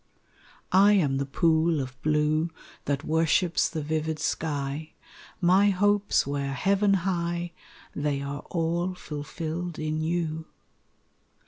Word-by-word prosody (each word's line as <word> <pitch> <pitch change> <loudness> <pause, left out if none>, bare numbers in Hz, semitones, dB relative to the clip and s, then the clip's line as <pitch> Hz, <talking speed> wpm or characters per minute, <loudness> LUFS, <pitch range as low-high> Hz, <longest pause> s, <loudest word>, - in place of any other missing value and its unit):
I 200 +2 +6
am 145 -9 +2
the 140 0 -2
pool 160 +2 +2
of 130 -1 -6
blue 155 +2 +1 0.4
That 140 0 -1
worships 160 +2 +2
the 155 -3 -4
vivid 155 +1 -1
sky; 150 -1 -3 0.5
My 190 +3 +5
hopes 205 +1 +2
were 140 0 -2
heaven 195 +5 +2
high, 175 -2 -1 0.4
They 145 -1 -1
are 140 +1 -5
all 170 +2 -1
fulfilled 160 +3 -5
in 155 0 -2
you. 160 -1 -2
160 Hz, 115 wpm, -27 LUFS, 150-175 Hz, 0.5 s, I